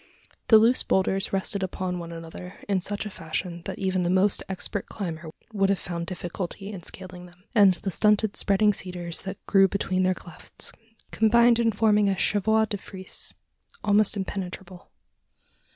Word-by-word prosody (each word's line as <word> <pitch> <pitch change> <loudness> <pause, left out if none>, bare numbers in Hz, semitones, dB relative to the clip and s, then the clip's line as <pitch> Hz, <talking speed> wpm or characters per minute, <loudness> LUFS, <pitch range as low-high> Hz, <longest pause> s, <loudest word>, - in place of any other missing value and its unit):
The 225 - +8
loose 230 +4 +5
boulders 190 0 +1
rested 195 +1 0
upon 185 -1 -3
one 170 -1 -7
another, 165 +2 -9
in 195 -2 +1
such 205 +3 -2
fashion, 170 -2 -4
that - - -5
even 190 -2 0
the 175 - 0
most 190 +2 +3
expert 190 +1 -3
climber 170 -5 -5 0.2
would 195 -2 +2
have 200 - +2
found 170 -1 -5
difficulty 185 +2 -5
in 195 -4 -7
scaling 180 0 -8
them; 180 +1 -21
and 200 -5 +6
the 195 - -4
stunted 210 +1 +2
spreading 210 +1 +3
cedars 180 -3 -4
that 190 0 -6
grew 195 -1 +5
between 185 -1 -1
their 185 0 +2
clefts, 175 -1 -8 0.4
combined 235 +2 +4
in 230 -1 +3
forming 210 -1 +3
a 190 - 0
chevaux 220 +3 +2
de 205 -1 -4
frise 190 -1 -4 0.5
almost 210 0 +3
impenetrable. 190 -2 -6
190 Hz, 160 wpm, -26 LUFS, 180-205 Hz, 0.5 s, The